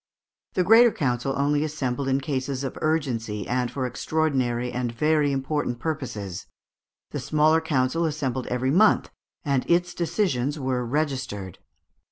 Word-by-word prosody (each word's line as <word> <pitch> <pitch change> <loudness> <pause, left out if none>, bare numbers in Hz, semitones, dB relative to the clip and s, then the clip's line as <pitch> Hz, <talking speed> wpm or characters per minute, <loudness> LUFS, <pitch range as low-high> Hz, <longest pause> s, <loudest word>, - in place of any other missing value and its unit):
The 185 - +3
Greater 225 +5 +7
Council 135 - -1
only 145 +1 +2
assembled 140 -3 -2
in 135 +1 +1
cases 135 -1 -2
of 135 - -4
urgency 120 - -1
and 125 0 0
for 130 0 -3
extraordinary 125 -3 0
and 125 -1 -2
very 150 +4 +2
important 135 -2 -1
purposes, 120 - -4 0.6
the - - -3
Smaller 155 +1 +3
Council 155 +1 +1
assembled 135 -5 -2
every 125 +2 0
month, 205 +7 +4 0.3
and 140 -3 +1
its 175 +1 +2
decisions 155 - 0
were 130 -3 -1
registered. 130 - -3
135 Hz, 135 wpm, -25 LUFS, 125-155 Hz, 0.6 s, Greater